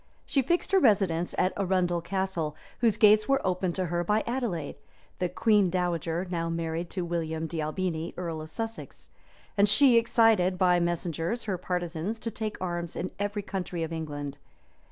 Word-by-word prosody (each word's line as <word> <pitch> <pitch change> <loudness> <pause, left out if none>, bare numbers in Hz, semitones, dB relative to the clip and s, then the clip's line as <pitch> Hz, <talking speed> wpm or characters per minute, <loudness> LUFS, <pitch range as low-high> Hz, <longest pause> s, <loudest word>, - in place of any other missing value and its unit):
She 275 - +2
fixed 340 +10 0
her 390 - +5
residence 190 - +2
at 185 - +2
Arundel 180 -3 +1
Castle, 185 -4 -2 0.2
whose 230 -3 +3
gates 215 0 +6
were 275 0 +4
opened 180 -1 0
to 185 - -1
her 175 0 -1
by 210 +4 +1
Adelais, 230 - -3 0.4
the 180 - 0
queen 210 -3 +3
dowager, 175 -1 -1
now 165 -2 -2
married 165 +1 -3
to 180 -2 -3
William 165 -2 -2
de 160 0 -3
Albini, 160 +1 -2
earl 165 -3 -4
of 155 - -8
Sussex; 225 +5 -6 0.4
and 200 0 +4
she 250 +3 +6
excited, 225 -6 +4
by 180 -1 +4
messengers, 170 +4 -1
her 190 -4 -2
partisans 180 +3 -3
to 230 +1 -4
take 215 -1 -4
arms 175 -2 -3
in 185 - -3
every 205 0 -2
county 180 -4 -3
of 165 0 -4
England. 145 -3 -5
180 Hz, 170 wpm, -28 LUFS, 165-210 Hz, 0.4 s, gates